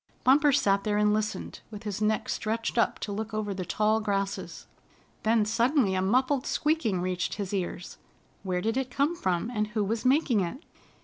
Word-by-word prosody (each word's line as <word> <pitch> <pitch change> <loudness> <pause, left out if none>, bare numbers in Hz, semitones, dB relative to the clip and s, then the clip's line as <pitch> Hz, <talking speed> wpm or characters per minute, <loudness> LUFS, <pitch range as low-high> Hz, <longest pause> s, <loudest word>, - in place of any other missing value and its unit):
Bumper 285 +3 +5
sat 200 -8 +2
there 210 -1 0
and 210 0 +3
listened, 215 0 -3
with 210 -1 -9
his 210 -1 -4
neck 215 0 +1
stretched 225 +1 -1
up - - +2
to 205 - -3
look 215 +2 -4
over 210 -2 -2
the 185 -1 -4
tall 215 +4 +1
grasses. 200 -2 -3 0.6
Then 220 -1 +3
suddenly 235 0 +2
a 185 - +1
muffled 255 +7 +1
squeaking 300 - 0
reached 180 0 -2
his 200 -1 -4
ears. 180 -2 -4 0.4
Where 185 -2 -2
did 225 +5 -1
it 265 -1 -1
come 285 +7 0
from, 185 - -1
and 210 -2 0
who 210 0 -1
was 220 +3 -2
making 260 -3 +3
it? 195 - -3
215 Hz, 185 wpm, -28 LUFS, 200-245 Hz, 0.6 s, Bumper